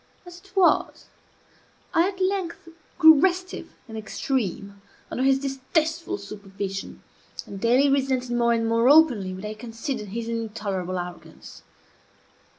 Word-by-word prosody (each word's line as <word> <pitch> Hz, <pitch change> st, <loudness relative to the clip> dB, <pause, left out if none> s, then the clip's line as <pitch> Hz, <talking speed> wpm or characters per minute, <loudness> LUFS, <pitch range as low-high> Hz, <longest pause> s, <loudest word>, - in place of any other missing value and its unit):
As 350 Hz, 0 st, -11 dB
it 390 Hz, +1 st, -22 dB
was, 380 Hz, -2 st, +2 dB, 0.9 s
I 335 Hz, +2 st, +4 dB
at 385 Hz, -1 st, -6 dB
length 370 Hz, -3 st, -2 dB, 0.3 s
grew 320 Hz, -4 st, +8 dB
restive 370 Hz, +2 st, -1 dB
in 225 Hz, -, -11 dB
the 220 Hz, -, -4 dB
extreme 200 Hz, -4 st, -3 dB, 0.3 s
under -, -, -2 dB
his 270 Hz, 0 st, +4 dB
distasteful 315 Hz, +7 st, -2 dB
supervision, 195 Hz, -, -7 dB, 0.4 s
and 195 Hz, -1 st, -9 dB
daily 250 Hz, +5 st, +4 dB
resented 265 Hz, -2 st, 0 dB
more 240 Hz, 0 st, +2 dB
and 230 Hz, -1 st, 0 dB
more 230 Hz, +2 st, +3 dB
openly 270 Hz, -11 st, +5 dB
what 190 Hz, +2 st, -7 dB
I 210 Hz, -, -4 dB
considered 225 Hz, +1 st, -5 dB
his 230 Hz, +3 st, -5 dB
intolerable 210 Hz, -5 st, -3 dB
arrogance. 175 Hz, 0 st, -9 dB
245 Hz, 135 wpm, -25 LUFS, 210-320 Hz, 0.9 s, grew